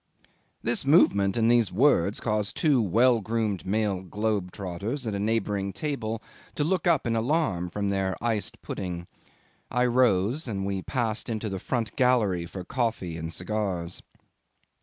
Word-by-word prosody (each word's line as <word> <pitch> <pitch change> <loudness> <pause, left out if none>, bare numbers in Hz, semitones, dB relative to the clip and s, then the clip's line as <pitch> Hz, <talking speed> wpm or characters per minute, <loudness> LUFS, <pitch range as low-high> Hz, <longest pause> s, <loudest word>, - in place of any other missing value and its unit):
'This 120 - +1
movement 100 - +4
and 115 0 +4
these 120 -5 +3
words 105 -4 +3
caused 105 -3 -1
two 145 -7 +3
well 115 +4 +3
groomed 110 -3 -2
male 100 -2 0
globe 105 0 -2
trotters 100 +9 -4
at 110 - -2
a 100 - -2
neighbouring 105 -2 0
table 115 -5 -3 0.3
to 145 - 0
look 180 +3 0
up 165 -5 +3
in 115 -1 0
alarm 115 - 0
from 100 +2 -2
their 95 -1 0
iced 115 -3 -2
pudding. 90 -2 -4 0.6
I 125 0 +2
rose, 125 - +2
and 100 -4 -2
we 100 -1 -2
passed 115 +1 -2
into 110 -1 -2
the 95 -1 -4
front 115 +2 -2
gallery 110 -10 +2
for 95 +1 -7
coffee 110 -7 -2
and 80 0 -5
cigars. 90 -3 -3
110 Hz, 155 wpm, -27 LUFS, 95-120 Hz, 0.6 s, movement